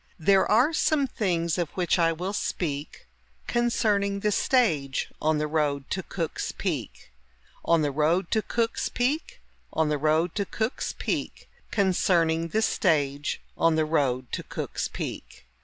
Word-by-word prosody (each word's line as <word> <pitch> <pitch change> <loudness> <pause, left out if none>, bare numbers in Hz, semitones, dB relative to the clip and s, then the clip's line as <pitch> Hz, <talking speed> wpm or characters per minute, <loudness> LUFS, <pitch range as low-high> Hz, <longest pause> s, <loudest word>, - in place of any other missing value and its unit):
There 190 +4 +3
are 245 +9 +4
some 305 -2 +2
things 175 - -1
of 170 -4 -1
which 180 0 +2
I 165 -1 +4
will 180 +5 -3
speak 150 -7 -3 0.4
Concerning 210 -4 +1
the 210 - +1
stage 165 - +1
on 155 0 +2
the 150 - 0
road 150 -3 -1
to 190 - -1
Cook's 170 -3 -4
Peak. - - -4 0.5
On 165 -2 +3
the 145 - 0
road 160 +6 +1
to 220 - +2
Cook's 230 +1 -1
Peak, 270 +6 -1 0.3
On 160 -1 +1
the 150 -1 0
road 155 +3 +2
to 200 - -1
Cook's 220 +3 -2
Peak, - - -3 0.2
Concerning 170 -4 +2
the 220 +6 0
stage 145 -8 +1
on 165 -1 +3
the 155 0 +2
road 130 -5 0
to - - -2
Cook's - - -4
Peak. - - -7
170 Hz, 150 wpm, -26 LUFS, 155-205 Hz, 0.5 s, are